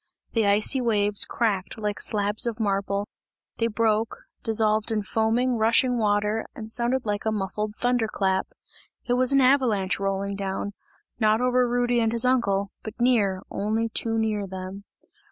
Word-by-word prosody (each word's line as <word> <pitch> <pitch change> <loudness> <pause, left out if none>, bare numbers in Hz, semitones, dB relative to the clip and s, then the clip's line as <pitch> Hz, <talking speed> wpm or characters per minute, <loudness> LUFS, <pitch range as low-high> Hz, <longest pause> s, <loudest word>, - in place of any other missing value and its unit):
The 225 -3 +2
icy 210 +6 +2
waves 210 -3 +2
cracked 205 -5 -1
like 210 -1 -3
slabs 210 +2 +2
of 235 -1 -3
marble, 200 -1 -1 0.5
they 230 - +1
broke, 225 0 0 0.2
dissolved 220 0 +1
in 215 -2 0
foaming, 230 +4 +1
rushing 235 +3 +3
water 210 +1 +1
and 220 -1 -8
sounded 240 +2 0
like 205 -1 -2
a 220 - 0
muffled 210 +1 -3
thunder 245 -1 +1
clap. 190 -2 0 0.6
It 245 - 0
was 255 +1 +3
an 275 0 +4
avalanche 245 -9 +2
rolling 195 0 -2
down, 195 +1 -4 0.5
not 215 -1 +3
over 250 0 +2
Rudy 245 0 +1
and 225 -1 +1
his 235 +1 +2
uncle, 200 -6 +1
but 220 +1 -9
near, 210 -6 +2
only 220 +3 -1
too 225 0 -1
near 220 -2 0
to 200 - -5
them. 190 +1 -7
220 Hz, 160 wpm, -25 LUFS, 205-235 Hz, 0.6 s, an